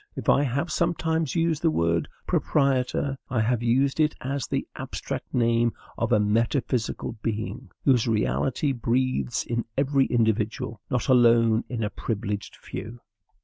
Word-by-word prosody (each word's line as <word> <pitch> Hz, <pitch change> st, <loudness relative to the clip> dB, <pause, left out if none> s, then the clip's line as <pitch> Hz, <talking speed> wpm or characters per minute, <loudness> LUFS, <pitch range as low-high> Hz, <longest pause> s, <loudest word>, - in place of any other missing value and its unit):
If -, -, -3 dB
I -, -, +5 dB
have 140 Hz, +4 st, -1 dB
sometimes 165 Hz, -2 st, 0 dB
used 165 Hz, -2 st, +1 dB
the 165 Hz, -, +3 dB
word 85 Hz, -, +1 dB, 0.2 s
PROPRIETOR, 135 Hz, -1 st, +1 dB
I 120 Hz, -4 st, +1 dB
have 115 Hz, +1 st, +1 dB
used 130 Hz, +5 st, +2 dB
it 155 Hz, -1 st, +3 dB
as 135 Hz, 0 st, -3 dB
the -, -, -2 dB
abstract -, -, -5 dB
name 115 Hz, -1 st, +2 dB, 0.2 s
of -, -, -1 dB
a 105 Hz, -, +5 dB
metaphysical 115 Hz, +2 st, 0 dB
being, 110 Hz, 0 st, -4 dB, 0.2 s
whose 125 Hz, -4 st, +4 dB
reality 120 Hz, +5 st, +1 dB
breathes 120 Hz, -, 0 dB
in 120 Hz, 0 st, -2 dB
every 135 Hz, 0 st, +2 dB
individual, 110 Hz, -2 st, 0 dB
not 125 Hz, -2 st, -1 dB
alone 115 Hz, -2 st, +5 dB
in 120 Hz, -3 st, -2 dB
a 105 Hz, -, -2 dB
privileged 105 Hz, -2 st, -4 dB
few. 120 Hz, +2 st, -8 dB
120 Hz, 145 wpm, -26 LUFS, 110-140 Hz, 0.2 s, I